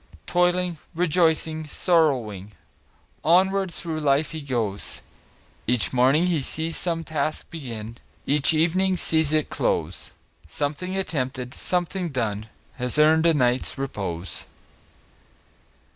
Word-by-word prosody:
Toiling, 180 -1 +1 0.2
rejoicing, 160 -2 +1
sorrowing, 125 - +1 0.7
Onward 190 +3 +3
through 165 -2 -4
life 145 0 +2
he 160 -1 -5
goes; 115 -8 -2 0.6
Each 125 +1 +1
morning 130 +7 +4 0.2
sees 160 +4 0
some 165 -2 0
task 155 -1 -3
begin, 115 -8 -7 0.3
Each 145 +2 +3
evening 180 +4 +2
sees 160 -3 +3
it 155 -1 +1
close - - -2 0.3
Something 150 - -3
attempted, 130 -8 -3
something 180 0 -1
done, 110 -6 -2 0.3
Has 125 +2 0
earned 160 +2 +5
a 165 - +4
night's 125 -1 +1
repose. 95 -10 -4
155 Hz, 105 wpm, -24 LUFS, 125-170 Hz, 0.7 s, earned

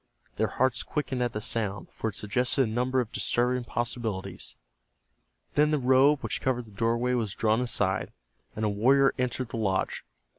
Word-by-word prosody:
Their - - +2
hearts 130 -1 +1
quickened 135 -4 -2
at 120 -1 +1
the 105 - -4
sound, 105 -3 -2
for 110 - -3
it 105 - -9
suggested 125 +5 +1
a - - +1
number 125 +3 +1
of 115 - -6
disturbing 125 +1 0
possibilities. 110 -6 -3 1.0
Then 150 +1 +4
the 155 - +2
robe 135 +2 +4
which - - -3
covered 125 -2 0
the 110 - -15
doorway 115 +4 0
was 110 -6 -1
drawn 110 +1 +2
aside, 105 -6 0 0.4
and 110 - -1
a - - +3
warrior 135 +7 +4
entered 125 -1 -1
the 115 - -5
lodge. 95 -4 -1
120 Hz, 175 wpm, -28 LUFS, 110-130 Hz, 1.0 s, Then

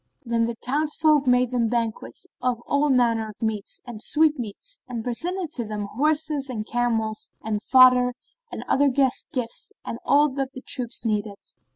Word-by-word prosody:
Then 230 -1 +1
the 235 0 -3
townsfolk 300 +3 +1
made 250 0 +3
them 235 -3 +1
banquets 230 -2 -2 0.2
of 250 -2 0
all 285 +1 +1
manner 230 -4 +2
of 210 - -12
meats 215 -2 -3
and 235 -4 -8
sweetmeats 300 - +1
and 240 -3 -5
presented 335 +8 -2
to 250 -6 -3
them 210 -1 -4
horses 300 0 +1
and 215 -4 -4
camels 225 -2 -1
and 215 -1 -2
fodder 250 0 +6 0.4
and - - -6
other 280 +1 +3
guest 265 -1 +1
gifts 245 -3 -3
and 230 - -5
all 295 +1 +4
that 270 0 -3
the 260 - -8
troops 250 -3 -2
needed. 210 -2 -1
250 Hz, 165 wpm, -24 LUFS, 225-280 Hz, 0.4 s, fodder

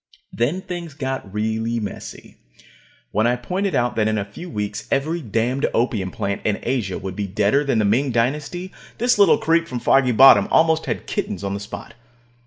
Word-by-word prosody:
Then 145 +11 0
things 175 -5 -7
got 135 -8 -4
really 110 +2 -1
messy. 105 -2 -8 0.7
When 110 +3 +2
I 120 - +2
pointed 185 +10 -2
out 120 0 +1
that 110 -1 +2
in 110 0 0
a 100 - -2
few 170 - -10
weeks 105 -8 -4
every 155 +5 0
damned 120 +3 0
opium 110 -5 0
plant 100 +2 -3
in 105 -2 0
Asia 115 -7 -1
would 95 -1 -6
be 100 0 -3
deader 105 +8 +2
than 135 -5 0
the 110 - +2
Ming 125 +7 +2
Dynasty, 145 +10 -1 0.3
this 245 -1 +2
little 205 +2 +6
creep 170 -6 +1
from 125 - -4
Foggy 135 +1 +3
Bottom 115 -4 +7
almost 160 0 +3
had - - -3
kittens 95 - -3
on 100 0 -2
the 100 - -3
spot. 105 +2 -8
120 Hz, 190 wpm, -21 LUFS, 105-155 Hz, 0.7 s, Bottom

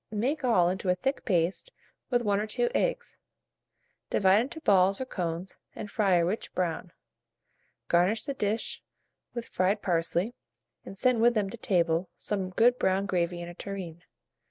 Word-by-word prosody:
Make 255 +8 -1
all 205 -9 +4
into 185 +1 -1
a 180 - +4
thick 270 +8 -2
paste 180 - 0 0.4
with 245 -1 +1
1 205 -2 +1
or 215 - -2
2 485 - 0
eggs; - - -1 0.9
divide 195 +2 +4
into 280 +7 -5
balls 195 -5 +4
or 260 - -2
cones, 175 -5 -4 0.2
and 205 - -7
fry 200 -5 +2
a 170 -1 +3
rich 195 +6 -3
brown. 175 0 -2 1.0
Garnish 180 +6 +2
the 280 - -2
dish 215 -3 -2 0.5
with 235 -1 -4
fried 195 +3 0
parsley, 175 +4 0 0.5
and 195 - -10
send 250 +1 +2
with 240 +1 +4
them 200 -3 0
to 235 - -8
table 170 -4 +1
some 195 -3 -2
good 240 +6 +3
brown 190 +1 +1
gravy 175 -2 -1
in - - -7
a 175 - -8
tureen. 180 -3 -7
195 Hz, 165 wpm, -28 LUFS, 180-230 Hz, 1.0 s, all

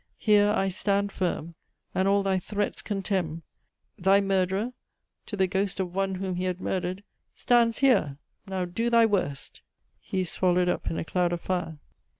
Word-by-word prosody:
Here 205 -1 +4
I 195 -2 +1
stand 200 +1 0
firm, 170 -3 -2 0.4
and 190 +1 +1
all 200 0 +3
thy 190 -1 +1
threats 205 +2 -2
contemn. 185 -5 -2 0.6
Thy 195 +2 +5
murderer 195 +4 0 0.5
(to 205 - -5
the 190 - +3
ghost 195 +1 -1
of 180 -2 -2
one 195 0 0
whom 185 -1 -3
he 180 - -1
had 180 -1 -2
murdered) 185 +1 -3 0.3
Stands 235 -2 +3
here! 205 - +3 0.3
Now 190 -1 -2
do 225 +7 -1
thy 230 -1 +5
worst!" 185 -10 -2 0.4
(He 190 - -3
is 180 - -3
swallowed 180 -1 +2
up - - -1
in 165 - -3
a - - -3
cloud 175 0 0
of 170 - -3
fire.) 175 -4 -2
190 Hz, 170 wpm, -27 LUFS, 180-200 Hz, 0.6 s, Thy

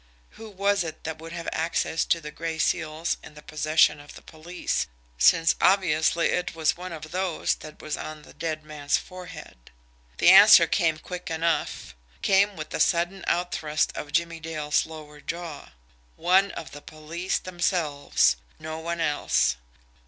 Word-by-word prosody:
Who 225 - -11
was 200 -1 +1
it 160 -1 -8
that 160 0 -5
would 165 +1 -9
have 170 0 -6
access 165 0 0
to 165 - +1
the 150 -1 -8
gray 165 +1 -4
seals 155 +1 -1
in 150 - -13
the 150 - -13
possession 155 0 +2
of 145 0 -13
the - - -13
police, 170 +3 -3 0.3
since, 165 - +5
obviously, 170 -3 +3
it 180 -2 -2
was 160 -2 +1
one 180 +1 -8
of 155 -1 -8
those 185 -3 0
that 155 0 -12
was 155 - -3
on 155 -1 -7
the - - -15
dead 155 -2 -4
man's 150 -2 -1
forehead? 175 - -11 0.5
The - - +6
answer - - +9
came 160 -2 +1
quick 180 +3 -7
enough 165 - -2 0.3
came 200 +1 +3
with 155 -1 -7
the - - -3
sudden 175 +2 +1
out 175 +1 0
thrust 155 0 -1
of 145 - -6
Jimmie 170 +1 0
Dale's 155 -2 -1
lower 150 -2 -11
jaw. 165 -1 -6 0.5
ONE 190 +3 +3
OF 160 - -8
THE 145 - -10
POLICE 165 +5 -4
THEMSELVES 170 - +1 0.2
no 160 +1 -6
one 170 +1 -4
else. 145 - +1
160 Hz, 165 wpm, -26 LUFS, 155-175 Hz, 0.5 s, answer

